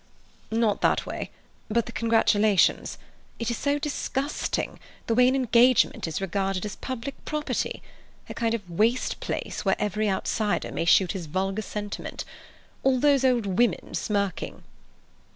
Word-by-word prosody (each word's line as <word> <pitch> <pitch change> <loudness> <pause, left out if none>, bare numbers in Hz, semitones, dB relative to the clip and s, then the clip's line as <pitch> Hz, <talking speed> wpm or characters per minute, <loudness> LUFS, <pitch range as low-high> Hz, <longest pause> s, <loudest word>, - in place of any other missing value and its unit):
"Not 225 -2 +1
that, - - +3 0.7
but 235 +1 +1
the - - -7
congratulations. 220 -3 +3 0.4
It 230 0 -2
is 235 - -2
so 285 0 +1
disgusting, 290 -1 -2 0.3
the 230 - +1
way 250 +2 +5
an 260 - +3
engagement 245 -5 +4
is 160 - -3
regarded 195 0 -1
as 205 - -5
public 260 +1 -6
property—a 300 -1 -5
kind 230 -1 0
of 205 -5 -7
waste 220 +9 +1
place - - -4
where - - +3
every 210 +1 0
outsider 205 +2 -1
may - - -2
shoot 180 +1 +5
his 185 -5 -5
vulgar 190 +5 -1
sentiment. 205 0 -5 0.6
All 265 -1 +3
those 280 -1 +4
old 250 -4 +3
women 195 0 +1
smirking!" 200 -4 -2
225 Hz, 135 wpm, -26 LUFS, 200-250 Hz, 0.7 s, way